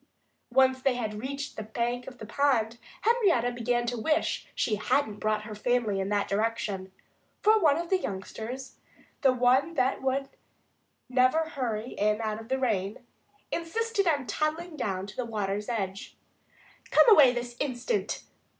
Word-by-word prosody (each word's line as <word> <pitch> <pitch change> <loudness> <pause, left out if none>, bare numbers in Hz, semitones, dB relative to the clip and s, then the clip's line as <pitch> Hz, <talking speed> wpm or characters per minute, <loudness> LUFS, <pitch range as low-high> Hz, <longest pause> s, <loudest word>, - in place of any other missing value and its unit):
Once 260 0 +4
they 265 -1 +2
had 215 -3 -3
reached 280 +2 -5
the - - -3
bank 240 +3 -2
of 255 - -9
the 220 - -8
pond 235 -2 +1 0.2
Henrietta 395 - +3
began 240 0 0
to 240 -1 -2
wish 305 +7 0
she 215 -3 0
hadn't 215 -1 0
brought 215 0 0
her 215 0 -7
family 220 -2 0
in 190 0 -2
that 205 -1 +1
direction. 205 -3 -1 0.5
For 435 +1 +6
one 305 -6 +4
of 340 +1 -4
the 380 - +4
youngsters 225 - -6 0.4
the 270 - +5
one 255 +6 +3
that 260 -1 +1 1.1
never 255 +5 +3
would 320 - -9
hurry 240 -5 -2
in 210 +1 +1
out 220 -1 -2
of 225 - -13
the 265 - +1
rain 215 -4 -1 0.5
insisted 400 +4 -1
on 290 -5 +2
toddling 310 +8 -2
down 195 -8 -2
to 200 - -10
the 255 - -2
water's 210 -2 -3
edge. 195 -4 -4 0.7
"Come - - +6
away 300 - +8
this 240 -1 -4
instant!" 285 - -2
245 Hz, 160 wpm, -28 LUFS, 215-280 Hz, 1.1 s, away